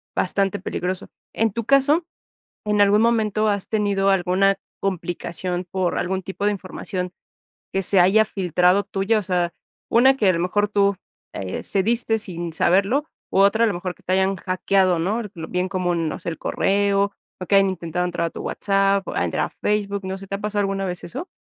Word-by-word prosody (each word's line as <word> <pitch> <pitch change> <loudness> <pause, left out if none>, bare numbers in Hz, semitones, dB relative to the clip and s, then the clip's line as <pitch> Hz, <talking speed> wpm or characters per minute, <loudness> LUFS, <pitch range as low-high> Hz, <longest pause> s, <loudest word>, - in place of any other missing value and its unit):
bastante 195 +1 0
peligroso. 180 0 -4 0.2
En 225 -1 +1
tu 230 -2 -3
caso, 285 +5 +3 0.6
¿en 210 -1 +2
algún 205 +2 +5
momento 220 -2 +2
has 200 -2 -2
tenido 200 -2 +1
alguna 195 +1 +2 0.2
complicación 180 -1 -3
por 185 0 -1
algún 190 +1 -1
tipo 195 +1 -4
de 210 - +3
información 185 -1 -5 0.6
que 195 - 0
se 190 +1 +3
haya 200 +5 +5
filtrado 180 0 +2
tuya? 205 +3 0
O - - -2
sea, 175 -2 0 0.4
una 260 +3 +5
que 210 -7 +2
a - - +5
lo 170 - -1
mejor 205 +3 +1
tú, 200 -1 +2 0.4
eh, 95 -1 -5
cediste 225 +3 +1
sin 175 -5 -5
saberlo, 200 - +2 0.3
u 195 - +2
otra 210 +4 +4
a - - +4
lo 210 - 0
mejor 180 +1 -4
que - - -26
te 185 - 0
hayan 190 +1 +2
hackeado, 185 -1 +1
¿no? 205 +8 0
Eh, 215 - -5 0.2
bien 180 +1 -1
como, 185 -2 -1
no 165 -2 -2
sé, - - -7
el 160 - -7
correo, 200 0 +1 0.3
o 185 - -5
que 200 - +3
hayan 195 -1 +4
intentado 180 0 -3
entrar 170 -1 -1
a - - -15
tu - - -8
WhatsApp, 195 -1 +1
a - - -1
entrar - - 0
a - - -11
Facebook, 200 -1 -2
no 190 0 -3
sé, 195 - -10
¿te 200 - -3
ha 200 - -11
pasado 210 0 -1
alguna 195 -1 -1
vez 180 -1 -4
eso? 330 - -6
195 Hz, 200 wpm, -22 LUFS, 180-205 Hz, 0.6 s, algún